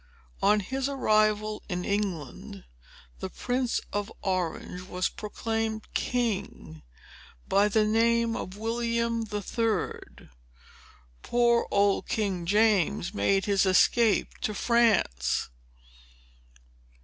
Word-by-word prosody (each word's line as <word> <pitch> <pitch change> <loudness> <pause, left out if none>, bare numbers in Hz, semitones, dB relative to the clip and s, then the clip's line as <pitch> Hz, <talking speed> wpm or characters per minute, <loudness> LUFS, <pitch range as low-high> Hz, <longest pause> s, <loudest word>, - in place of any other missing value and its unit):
On 210 +1 +4
his 265 +6 -2
arrival 215 -5 +1
in 180 -1 -3
England, 195 -9 -3 0.6
the - - -4
Prince 250 -1 -1
of 205 +1 -2
Orange 180 -1 -2
was 185 -1 -2
proclaimed 220 0 -4
king, 205 - -2 0.7
by 200 +1 +3
the 215 +1 +2
name 230 +1 +2
of 185 +2 -6
William 230 +1 -1
the 210 -1 -4
Third. 225 - -3 0.9
Poor 240 -1 +2
old 200 0 +2
King 190 -6 -2
James 205 -4 +2
made 195 - +1
his 200 -2 +2
escape 205 +3 +3
to 210 - -2
France." 205 - +1
210 Hz, 100 wpm, -27 LUFS, 195-230 Hz, 0.9 s, On